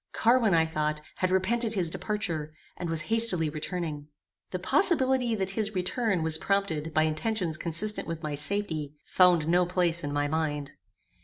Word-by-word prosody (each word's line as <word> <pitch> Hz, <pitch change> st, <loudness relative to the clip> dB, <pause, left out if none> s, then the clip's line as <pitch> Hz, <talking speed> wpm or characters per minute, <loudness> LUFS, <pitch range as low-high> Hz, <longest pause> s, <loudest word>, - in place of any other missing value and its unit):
Carwin, 230 Hz, -4 st, +3 dB
I 160 Hz, 0 st, +4 dB
thought, 155 Hz, -1 st, -2 dB, 0.2 s
had 185 Hz, -, 0 dB
repented 220 Hz, +5 st, +1 dB
his 175 Hz, -4 st, -1 dB
departure, 165 Hz, -9 st, -3 dB, 0.2 s
and 175 Hz, -, -5 dB
was 165 Hz, -1 st, -1 dB
hastily 185 Hz, -5 st, +2 dB
returning. 155 Hz, -2 st, -4 dB, 0.4 s
The 185 Hz, -, -3 dB
possibility 260 Hz, -, +2 dB
that 190 Hz, -2 st, -2 dB
his 215 Hz, 0 st, -2 dB
return 185 Hz, 0 st, 0 dB
was 160 Hz, 0 st, +4 dB
prompted 165 Hz, -6 st, -1 dB
by 155 Hz, 0 st, +2 dB
intentions 165 Hz, +2 st, -1 dB
consistent 175 Hz, +7 st, 0 dB
with 165 Hz, 0 st, -5 dB
my 150 Hz, -1 st, -3 dB
safety, 150 Hz, -2 st, -1 dB
found 175 Hz, -4 st, +3 dB
no 175 Hz, +2 st, +3 dB
place 175 Hz, -2 st, 0 dB
in 145 Hz, -, -3 dB
my 145 Hz, 0 st, 0 dB
mind. 150 Hz, -2 st, -2 dB
175 Hz, 160 wpm, -27 LUFS, 155-205 Hz, 0.4 s, I